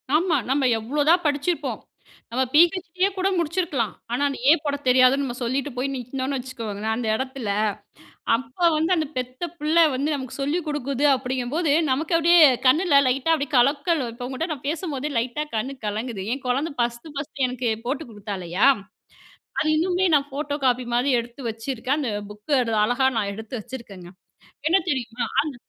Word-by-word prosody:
ஆமா, 335 0 +2
"நம்ம 270 -1 +2
எவ்வளோதான் 295 +9 +2
படிச்சிருப்போம், 295 +4 -1 0.5
நம்ம 260 +2 +1
பி-ஹெச்-டி 345 +2 +3
யே 395 - +5
கூட 375 +1 +1
முடிச்சுருக்கலாம்". 325 - -1 0.2
ஆனா 245 - -1
அந்த 275 - -5
ஏ - - +9
போடத் 285 -2 -3
தெரியாதுன்னு 255 +2 +5
நம்ம 240 -2 -4
சொல்லிட்டு 265 +4 -1
போய் 265 +2 -1
நிக்கனோம்னு 260 +2 -3
வச்சுக்கோங்களேன் 220 -4 -4
அந்த 235 -1 -3
இடத்துல, 260 -3 -4 0.9
அப்ப 275 +7 0
வந்து 320 +4 +1
அந்த 310 -2 0
பெத்த 255 +6 -4
பிள்ள 305 +2 0 0.2
வந்து 290 +4 0
நமக்கு 265 -2 -6
சொல்லி 290 +6 0
குடுக்குது 280 -1 0
அப்படிங்கும்போது 260 +5 -1 0.2
நமக்கு 315 +6 +1
அப்படியே 340 +1 +5 0.3
கண்ணுல 300 +2 +5
லைட்டா 270 +6 +1
அப்படியே 285 -2 -3
கலக்கல் 285 +4 +2
இப்போ 245 +1 -7
உங்ககிட்ட 315 +6 -3
நான் 275 -1 -11
பேசும்போதே 300 -3 -3
லைட்டா 250 +6 -2
கண் 250 +5 -2
கலங்குது. 215 0 -3
என் 275 - -10
குழந்தை 280 +6 0
ஃபஸ்த்து 240 +6 -2
ஃபர்ஸ்த்து 280 -2 -2
எனக்கு 250 -1 -2 0.2
போட்டு 285 +5 -2
கொடுத்தா 205 -2 -6
இல்லையா? 180 +9 +2 0.9
அது 310 - +1
இன்னுமே 360 +3 +1
நான் 285 -1 +3
ஃபோட்டோ 290 +1 -3
காப்பி 250 0 +2
மாதிரி 250 +4 +2
எடுத்து 240 +3 -8
வச்சிருக்கேன், 250 +4 -2
அந்த 250 -7 -2 0.2
புக்க 210 +6 -14 0.3
அழகா 245 +4 +2
நான் 200 -2 0
எடுத்து 220 +3 -9
வச்சுருக்கேங்க. 210 -7 -10 0.6
என்ன 370 - +5
தெரியுமா? 245 -3 -3 0.2
அந்த 300 -2 -5
270 Hz, 160 wpm, -24 LUFS, 245-300 Hz, 0.9 s, ஏ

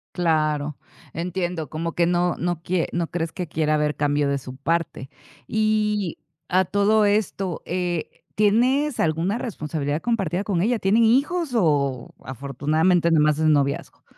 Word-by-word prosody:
Claro. 155 -4 0 0.4
Entiendo. 175 -2 -3
Como 165 +1 -4
que 170 - +2
no 175 0 +1
no 175 -2 -2
quie 175 0 -1
no 170 -1 -1
crees 165 -1 -3
que 180 -2 -5
quiera 155 0 0
haber 150 -1 0
cambio 145 0 +1
de 140 0 0
su 130 -1 -9
parte. 155 -2 -2 0.4
Y 210 -4 0 0.3
a 185 +1 +3
todo 210 +3 +3
esto, 200 -3 0
eh, 175 -2 -2 0.3
¿tienes 250 +7 +2
alguna 165 +7 0
responsabilidad 155 - -3
compartida 195 -6 -1
con 190 -5 -1
ella? 230 +4 +1
¿Tienen 210 +4 +3
hijos 280 +7 +2
o 140 - +1
afortunadamente, 150 +7 +1
no 160 -2 +4
más 150 0 +2
es 160 - +1
noviazgo? 140 -3 0
170 Hz, 150 wpm, -23 LUFS, 150-205 Hz, 0.4 s, no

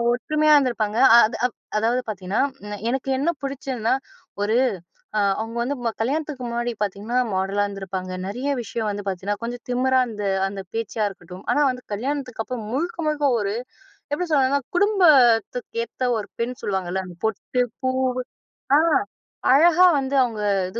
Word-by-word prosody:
ஒற்றுமையா 305 +3 +3
இருந்திருப்பாங்க, 230 -5 0 0.2
அ - - +10
அது 230 - -6 0.4
அதாவது 240 +3 +1
பாத்திங்கன்னா, 190 0 -1 0.5
எனக்கு 265 +1 -2
என்ன 295 +5 +1
பிடிச்சதுன்னா, 260 -4 -1 0.5
ஒரு 215 +2 +1 0.6
அ - - +3 0.2
அவங்க 225 +2 -4
வந்து 275 +4 -2
ம - - +3
கல்யாணத்துக்கு 285 +1 -2
முன்னாடி 240 0 -2
பாத்திங்கன்னா, 210 +5 -3
அ - - -5
மாடலா 195 +2 0
இருந்திருப்பாங்க, 190 -2 -5 0.3
றையா 280 +3 -1
விஷயம் 220 0 -3
வந்து 205 0 -5
பாத்திங்கன்னா, 195 +3 -3
கொஞ்சம் 240 +1 -5
திமிரா 260 +1 +3
அந்த 210 -2 -6 0.3
அந்த 195 0 -6
பேச்சா 225 -1 -3
இருக்கட்டும், 180 -1 -10
ஆனா 295 - +3
வந்து 250 0 -8
கல்யாணத்துக்கு 255 +1 -3
அப்பறம் 230 -4 -5
முழுக்க 340 +6 -2
முழுக்க 295 -1 0
ஒரு 200 -1 -1 0.6
எப்டி 355 +4 0
சொல்லணுனா, 280 0 +3 0.2
குடும்பத்துக்கு 265 - +4
ஏத்த 255 - -5
ஒரு 210 - -5
பெண் 245 +1 -3
சொல்லுவாங்கள்ல, 190 -1 -2
அந்த 175 - -11
பொட்டு, 220 +3 0 0.2
பூ, 260 -1 0 0.9
அ - - +6 0.7
அழகா 345 +5 +6
வந்து 270 +1 -2
அவங்க 225 -3 -3 0.3
இது 235 - -4
235 Hz, 150 wpm, -23 LUFS, 205-270 Hz, 0.9 s, அ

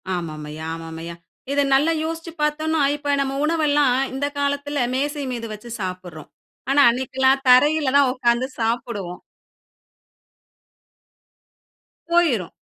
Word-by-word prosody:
ஆமாம் 155 -3 -5
ஐயா, 155 +1 -7
ஆமாம் 165 0 -8
ஐயா. 170 0 -7 0.4
இத 285 0 +2
நல்லா 290 +5 +4
யோசிச்சு 330 +1 -5
பாத்தோம்னா, 310 +1 0
இப்ப 290 -1 -2
நம்ம 275 0 -2
உணவெல்லாம் 295 -4 +2 0.2
இந்த 270 +2 -2
காலத்தில 285 -1 -1
மேசை 290 +2 -2
மீது 230 -1 -5
வச்சு 215 +3 -10
சாப்பிடறோம். 180 -4 -7 0.4
ஆனா 280 +1 +4
அன்னைக்குலாம் 265 +2 +1
தரையில 290 +2 +5
தான் 280 -2 +4
உட்காந்து 245 -1 +1
சாப்பிடுவோம். 225 -6 -3 2.9
போயிரும். 270 - +2
265 Hz, 115 wpm, -22 LUFS, 210-290 Hz, 2.9 s, தரையில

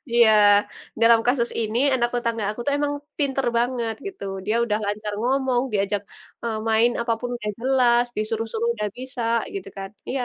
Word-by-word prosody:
Iya, 235 -2 +6 0.7
dalam 230 0 +6
kasus 245 -1 +2
ini 225 +1 -1 0.2
anak 240 -2 +1
tetangga 230 -2 -1
aku 215 - -7
itu 285 - 0
emang 290 0 0 0.3
pinter 270 -3 0
banget 235 -2 -1
gitu, 390 - -7 0.2
dia 215 - +1
udah 210 -2 0
lancar 210 +1 -3
ngomong, 260 0 +1
diajak, 200 0 0 0.4
eee, 225 -2 -2
main 225 +2 +4
apapun 235 +1 -2
udah 210 -3 -4
jelas, 245 -2 +3
disuruh-suruh 225 +1 -2
udah 210 -2 -2
bisa, 255 -1 -5 0.3
gitu 395 - -5
kan. 195 0 -6 0.2
Iya. 255 -1 -1
235 Hz, 165 wpm, -23 LUFS, 220-250 Hz, 0.7 s, Iya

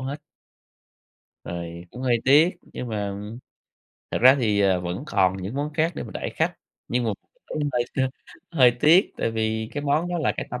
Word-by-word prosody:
hết." 135 +3 -5 1.2
Rồi 85 0 -6
cũng 125 - -8
hơi 125 -2 +2
tiếc, 150 +6 +6
nhưng 125 - -8
mà, 105 -3 -2
ừm, 105 +4 -7 0.7
thật - - -1
ra 130 +3 +8
thì, 105 -5 +2
ờ, 95 -2 +3
vẫn 90 +6 -4
còn 95 -5 +2
những 95 +5 -6
món 145 +2 -2
khác 160 +3 +1
để - - -4
mà - - -8
đãi - - -3
khách, - - -1 0.3
nhưng 125 0 0
mà 115 - +1 0.4
cũng - - -5
hơi 120 -1 +1
t - - -6 0.5
hơi 130 -7 +6
tiếc 170 +6 +5
tại - - -1
vì 110 0 -1
cái 145 - -3
món 150 +4 +1
đó 175 0 -2
là 155 - +1
cái - - -3
tâm 125 - -4
120 Hz, 205 wpm, -24 LUFS, 100-145 Hz, 1.2 s, ra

